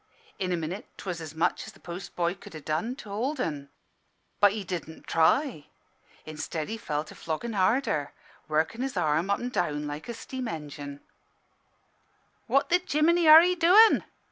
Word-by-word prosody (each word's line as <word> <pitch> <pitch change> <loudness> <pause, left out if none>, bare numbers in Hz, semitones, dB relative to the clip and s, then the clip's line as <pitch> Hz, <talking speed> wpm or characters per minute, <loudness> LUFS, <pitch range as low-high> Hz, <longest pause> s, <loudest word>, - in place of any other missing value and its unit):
In 185 -1 -1
a 175 - +1
minute 170 +5 -5
'twas 180 -3 -5
as 160 -1 -8
much 160 - 0
as - - -10
the - - -19
post 175 +1 -8
boy 170 0 0
could 175 - -13
ha' 155 - -9
done 165 +11 -1
to 230 -6 -11
hold 255 +9 -2
'en. 145 - -3 0.7
But 205 -1 +5
he 210 -2 -4
didn' 170 -3 -6
try. 165 - +2 0.6
Instead, 155 0 -5
he 225 - -3
fell 150 -7 -2
to 155 - -13
floggin' 170 +9 -4
harder, 190 - +1 0.4
workin' 160 +9 0
his 265 -6 -3
arm 160 +2 +1
up 200 - +2
an' 245 - -3
down 150 - -1
like 150 +7 -6
a 235 - -4
steam 255 +2 -6
engin'. 145 -3 -7 1.5
"'What 275 +7 +2
the 355 +1 +3
jiminy 335 +1 +2
are 315 +2 +11
'ee 360 +1 +3
doin?' 365 +6 +6
180 Hz, 175 wpm, -27 LUFS, 155-255 Hz, 1.5 s, are